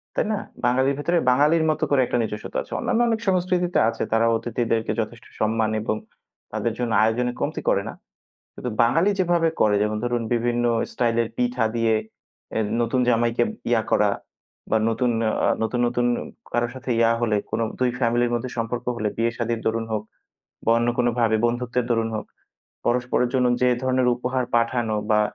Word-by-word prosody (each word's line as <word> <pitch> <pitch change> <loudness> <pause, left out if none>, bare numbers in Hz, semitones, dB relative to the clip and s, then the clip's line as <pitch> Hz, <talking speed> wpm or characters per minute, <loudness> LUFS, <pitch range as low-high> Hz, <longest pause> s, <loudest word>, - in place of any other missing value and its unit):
তাই - - +1
না? 205 - -1 0.3
বাঙালির 130 +3 +2
ভেতরে 170 +4 +1
বাঙালির 150 +5 +4
মতো 155 0 0
করে 140 -2 +4
একটা 125 - -1
নিজস্বতা 105 -1 -5
আছে। - - -21
অন্যান্য 235 - +1
অনেক 225 -1 +1
সংস্কৃতিতে 180 -1 +1
আছে 115 - -3
তারা 115 +1 +3
অতিথিদেরকে 115 -1 -1
যথেষ্ট 115 +1 -7
সম্মান 110 0 +1
এবং 110 - -1 0.6
তাদের 115 - -1
জন্য 120 -2 -1
আয়োজনে 120 +3 +1
কমতি - - -2
করে - - +3
না। - - -6 0.6
কিন্তু 125 - -5
বাঙালি 165 +12 +3
যেভাবে 175 -2 +2
করে 105 -1 +4
যেমন 105 0 0
ধরুন 120 -1 0
বিভিন্ন 120 0 0 0.3
স্টাইলের 115 -1 +1
পিঠা 245 0 0
দিয়ে 115 -1 +2 0.6
এ - - +2 0.2
নতুন 120 +2 0
জামাইকে 115 0 +2 0.3
ইয়া 115 -2 +3
করা 105 -1 +3 0.6
বা - - +3
নতুন 120 +2 +1 0.2
আ - - +1
নতুন, 115 +2 -1
নতুন 120 0 0 0.5
কারো 120 0 +1
সাথে 130 0 -6
ইয়া 115 0 +4
হলে 110 -3 +2
কোনো 115 - 0 0.2
দুই 125 -1 +3
ফ্যামিলির 120 -1 +1
মধ্যে 120 +2 -3
সম্পর্ক 115 +1 -2
হলে 110 -2 -1
বিয়ে 115 +1 +1
শাদির 115 -1 -2
দরুণ 115 0 0
হোক 105 -1 -1 0.6
বা - - +2
অন্য 120 +1 0
কোনোভাবে 120 -2 +2
বন্ধুত্বের 120 +1 -1
দরুণ 115 -1 +1
হোক, 105 - -5 0.6
পরস্পরের 125 0 +1
জন্য 125 -1 +3
যে 125 - +4
ধরনের 130 -1 +2
উপহার 125 +1 -1
পাঠানো 115 -1 +1 0.2
বা 105 0 +4
120 Hz, 170 wpm, -23 LUFS, 115-125 Hz, 0.6 s, বাঙালির